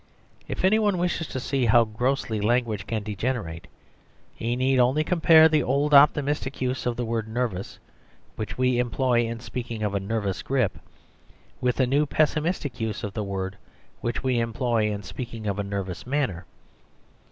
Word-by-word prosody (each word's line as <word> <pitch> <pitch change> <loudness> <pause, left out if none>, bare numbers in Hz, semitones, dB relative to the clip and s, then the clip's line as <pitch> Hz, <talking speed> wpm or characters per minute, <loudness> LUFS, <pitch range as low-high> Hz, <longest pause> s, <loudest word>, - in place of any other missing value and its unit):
If - - -2
any 215 +4 +4
one 205 -3 +2
wishes 175 -2 -1
to 130 - -4
see 130 -1 0
how 115 +1 +6
grossly 115 -1 -1
language 110 -3 0
can 110 -2 -2
degenerate, 105 -5 -3 0.7
he 120 +1 -2
need 130 +1 +2
only 130 +5 +3
compare 160 -1 +6
the 155 -1 +2
old 140 +3 +1
optimistic 145 -1 +4
use 130 0 -1
of 120 - 0
the 120 - -2
word 115 -1 -2
nervous, 110 -5 -3 0.6
which 110 - -5
we 125 -1 +2
employ 125 -1 +1
in 115 0 -5
speaking 120 -2 -5
of 105 -1 -1
a 100 - +1
nervous 100 -1 -2
grip, 130 -6 0 0.8
with 125 0 +1
the 130 - +2
new 145 +4 +2
pessimistic 155 -1 0
use 110 -2 -3
of 100 - -4
the 105 - -2
word, 95 0 -4 0.4
which 120 0 -3
we 130 -2 +1
employ 115 -2 0
in 100 0 -5
speaking 115 +2 -7
of 100 -1 -2
a - - 0
nervous 100 -1 -5
manner. 130 - -1
120 Hz, 170 wpm, -25 LUFS, 110-135 Hz, 0.8 s, how